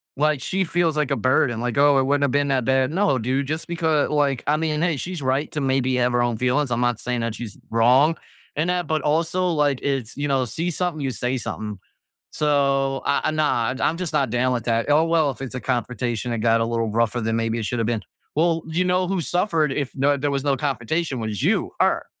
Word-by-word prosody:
Like, 150 Hz, -1 st, +1 dB
she 190 Hz, +6 st, -1 dB
feels 170 Hz, -2 st, 0 dB
like 150 Hz, -2 st, 0 dB
a -, -, +1 dB
burden, 130 Hz, -2 st, +1 dB
like, 120 Hz, +1 st, -2 dB
"Oh, 140 Hz, 0 st, +5 dB
it 135 Hz, -, +3 dB
wouldn't 140 Hz, +2 st, +1 dB
have 140 Hz, -, +2 dB
been 145 Hz, 0 st, +1 dB
that 130 Hz, -3 st, +1 dB
bad." 130 Hz, +1 st, +2 dB
No, 165 Hz, -7 st, +2 dB
dude, 130 Hz, +4 st, -1 dB
just 155 Hz, +3 st, -3 dB
because 160 Hz, -3 st, +1 dB
like 145 Hz, -3 st, +1 dB
I 150 Hz, +1 st, +3 dB
mean 155 Hz, -1 st, -1 dB
hey, 170 Hz, -4 st, +1 dB
she's 175 Hz, +3 st, -5 dB
right 135 Hz, +3 st, 0 dB
to 150 Hz, -, -2 dB
maybe 130 Hz, -1 st, +1 dB
have 125 Hz, 0 st, +2 dB
her 120 Hz, -, +2 dB
own 120 Hz, -2 st, 0 dB
feelings, 125 Hz, +3 st, +1 dB
I'm 120 Hz, +1 st, 0 dB
not 120 Hz, -2 st, +1 dB
saying 125 Hz, -1 st, -2 dB
that 115 Hz, -1 st, -2 dB
she's 110 Hz, -4 st, -8 dB
wrong 125 Hz, +8 st, +4 dB, 0.4 s
in 155 Hz, +4 st, 0 dB
that, 180 Hz, -1 st, 0 dB
but 155 Hz, -1 st, 0 dB
also, 165 Hz, +4 st, +1 dB
like, 145 Hz, -5 st, +1 dB
it's, 135 Hz, -5 st, -2 dB
you 145 Hz, -, -1 dB
know 135 Hz, -2 st, +1 dB
see 160 Hz, +10 st, -3 dB
something, 175 Hz, -2 st, -2 dB
you 135 Hz, -2 st, -1 dB
say 125 Hz, +3 st, -2 dB
something. 105 Hz, -4 st, -5 dB, 0.5 s
So, 140 Hz, -2 st, +1 dB
ah, 140 Hz, +2 st, +1 dB
nah, 125 Hz, -6 st, +1 dB
I'm 160 Hz, -, +1 dB
just 180 Hz, -3 st, -4 dB
not 135 Hz, -4 st, +1 dB
down 125 Hz, +1 st, +1 dB
with 120 Hz, -3 st, -3 dB
that. 115 Hz, +2 st, 0 dB
Oh 155 Hz, +3 st, +4 dB
well, 160 Hz, -4 st, +2 dB
if 130 Hz, -, -12 dB
it's 135 Hz, -1 st, -6 dB
a 125 Hz, -, -4 dB
confrontation, 120 Hz, -1 st, -2 dB
it 115 Hz, -, -2 dB
got 115 Hz, +1 st, +3 dB
a -, -, +2 dB
little 115 Hz, -1 st, -1 dB
rougher 115 Hz, +1 st, 0 dB
than 115 Hz, 0 st, -1 dB
maybe 115 Hz, 0 st, -1 dB
it 110 Hz, -, -3 dB
shoulda 115 Hz, 0 st, -1 dB
been. 115 Hz, -2 st, -1 dB, 0.3 s
Well, 165 Hz, +1 st, +2 dB
you 175 Hz, +3 st, 0 dB
know, 180 Hz, 0 st, +1 dB
who 190 Hz, 0 st, -1 dB
suffered 165 Hz, -, 0 dB
if 140 Hz, -3 st, -2 dB
no 140 Hz, +2 st, +2 dB
there 145 Hz, +1 st, -1 dB
was 135 Hz, 0 st, -1 dB
no 140 Hz, -2 st, +1 dB
confrontation, 140 Hz, +1 st, -2 dB
was 110 Hz, -4 st, -3 dB
you -, -, +1 dB
her, -, -, +2 dB
135 Hz, 240 wpm, -23 LUFS, 120-155 Hz, 0.5 s, Oh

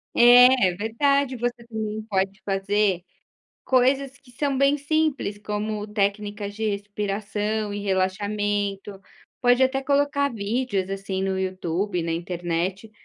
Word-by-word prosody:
É, 245 Hz, -2 st, +7 dB
é 180 Hz, -, -2 dB
verdade, 265 Hz, +6 st, +1 dB
você 240 Hz, 0 st, -3 dB
também 220 Hz, -1 st, -4 dB
pode 195 Hz, -1 st, -1 dB
fazer 195 Hz, -1 st, +1 dB, 0.6 s
coisas 265 Hz, +1 st, +2 dB
que 270 Hz, -3 st, -20 dB
são 275 Hz, +2 st, -1 dB
bem 275 Hz, +1 st, +4 dB
simples, 290 Hz, -7 st, -1 dB
como 210 Hz, 0 st, -3 dB
técnicas 205 Hz, 0 st, -2 dB
de 220 Hz, +1 st, -1 dB
respiração 205 Hz, +1 st, -3 dB
e 205 Hz, -, -4 dB
relaxamento. 200 Hz, +1 st, -1 dB, 0.4 s
Pode 245 Hz, +1 st, +4 dB
até 270 Hz, +1 st, +2 dB
colocar 280 Hz, +1 st, +1 dB
vídeos, 205 Hz, -2 st, -2 dB
assim, 195 Hz, -1 st, -3 dB
no 190 Hz, 0 st, -1 dB
YouTube, 185 Hz, 0 st, -2 dB
na 165 Hz, 0 st, -2 dB
internet, 175 Hz, +4 st, -3 dB
210 Hz, 125 wpm, -24 LUFS, 195-245 Hz, 0.6 s, É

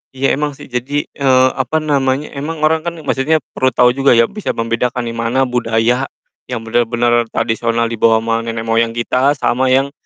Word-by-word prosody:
Iya 135 Hz, +1 st, +1 dB
emang 145 Hz, 0 st, -1 dB
sih. 130 Hz, -, -13 dB
Jadi, 135 Hz, +4 st, -2 dB
eee, 130 Hz, -2 st, +3 dB
apa 130 Hz, +4 st, -1 dB
namanya, 140 Hz, -1 st, 0 dB
emang 155 Hz, +2 st, -5 dB
orang 160 Hz, +1 st, +3 dB
kan 170 Hz, -, -3 dB
maksudnya 150 Hz, +2 st, 0 dB
perlu 130 Hz, -, +1 dB
tahu 125 Hz, 0 st, +5 dB
juga 135 Hz, 0 st, +3 dB
ya 115 Hz, -, +5 dB
bisa 210 Hz, 0 st, -4 dB
membedakan 115 Hz, +2 st, -1 dB
nih 115 Hz, 0 st, -5 dB
mana 115 Hz, +3 st, +1 dB
budaya 120 Hz, +1 st, 0 dB, 0.4 s
yang 125 Hz, -3 st, -4 dB
benar-benar 120 Hz, +1 st, +1 dB
tradisional 115 Hz, +1 st, -1 dB
dibawa 115 Hz, 0 st, +2 dB
sama 115 Hz, 0 st, 0 dB
nenek 115 Hz, 0 st, -4 dB
moyang 115 Hz, 0 st, 0 dB
kita 130 Hz, +4 st, +1 dB
sama 130 Hz, -1 st, 0 dB
yang, 135 Hz, +2 st, +2 dB
125 Hz, 180 wpm, -16 LUFS, 115-135 Hz, 0.4 s, tahu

